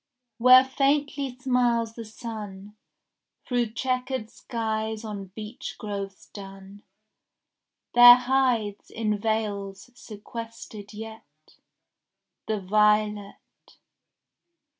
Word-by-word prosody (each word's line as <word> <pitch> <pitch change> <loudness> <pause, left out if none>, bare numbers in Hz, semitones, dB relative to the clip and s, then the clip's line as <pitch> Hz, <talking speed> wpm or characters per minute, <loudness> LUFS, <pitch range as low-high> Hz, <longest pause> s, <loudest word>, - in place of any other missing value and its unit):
Where 255 +2 +8
faintly 275 0 0
smiles 245 -3 +1
the 230 0 -8
sun 210 -3 -8 0.7
Through 240 -3 -1
chequered 255 -2 -2
skies 220 -1 -3
on 205 -2 -6
beech 215 +2 -7
groves 200 -2 -6
dun, 195 0 -11 1.1
There 245 0 +11
hides 250 -5 0
in 215 -2 -2
vales 205 -1 -3
sequestered 220 -2 -9
yet 210 -9 -12 0.9
The 215 -1 -1
violet. 210 +1 0
220 Hz, 80 wpm, -26 LUFS, 205-245 Hz, 1.1 s, There